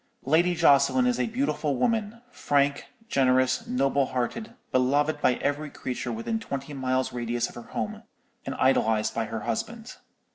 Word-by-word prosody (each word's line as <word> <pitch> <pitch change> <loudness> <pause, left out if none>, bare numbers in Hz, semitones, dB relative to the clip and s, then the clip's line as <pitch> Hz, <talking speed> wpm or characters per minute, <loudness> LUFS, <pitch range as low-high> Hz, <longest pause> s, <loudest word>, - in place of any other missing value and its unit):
Lady 170 +5 +3
Jocelyn 165 - +4
is 250 -1 +1
a - - +1
beautiful 225 - -1
woman, 225 - -1
frank, 140 0 0 0.2
generous, 130 - +2
noble 135 +1 +1
hearted, 130 - -3 0.2
beloved 145 +4 +2
by 125 - +3
every 145 +3 -2
creature 125 -2 -4
within 115 - -2
twenty 140 -8 -5
miles' 130 -1 -1
radius 120 0 -2
of - - -13
her 120 - -8
home, - - -4 0.4
and - - -5
idolized 110 -4 +2
by 115 - -1
her 110 0 -5
husband. 225 - -4
140 Hz, 150 wpm, -26 LUFS, 125-175 Hz, 0.4 s, Jocelyn